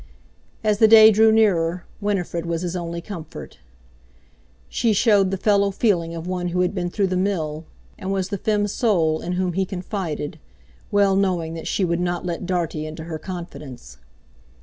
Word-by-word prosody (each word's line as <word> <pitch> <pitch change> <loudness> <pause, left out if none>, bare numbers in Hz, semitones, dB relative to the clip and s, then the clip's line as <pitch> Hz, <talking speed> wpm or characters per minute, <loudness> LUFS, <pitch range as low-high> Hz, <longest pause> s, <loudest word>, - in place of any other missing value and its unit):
As 210 -1 +1
the 220 - +7
day 220 0 +9
grew 220 +1 +5
nearer, 180 -6 +2
Winifred 180 -5 -2
was 170 0 -2
his 180 0 -3
only 170 -1 -4
comfort. 165 - -9 1.1
She 230 - +1
showed 205 -2 +4
the 195 - -2
fellow 200 0 +2
feeling 180 -5 0
of 165 0 -6
one 180 -1 -2
who 180 +1 0
had 180 +1 +1
been 175 -3 -2
through 200 +2 0
the 185 -1 -1
mill, 165 -5 -1 0.3
and 190 0 -4
was 190 -1 -1
the 200 -2 -3
"femme 210 -1 +1
sole" 180 -7 +1
in 180 - -3
whom 180 -1 -1
he 190 +2 +1
confided, 180 -5 -4 0.5
well 200 -1 +3
knowing 180 -4 0
that 165 - -6
she 195 - 0
would 170 0 0
not 175 0 -2
let 175 0 -4
Dartie 165 -4 -2
into 160 +1 -7
her 160 -1 -6
confidence. 150 - -9
180 Hz, 175 wpm, -22 LUFS, 170-200 Hz, 1.1 s, day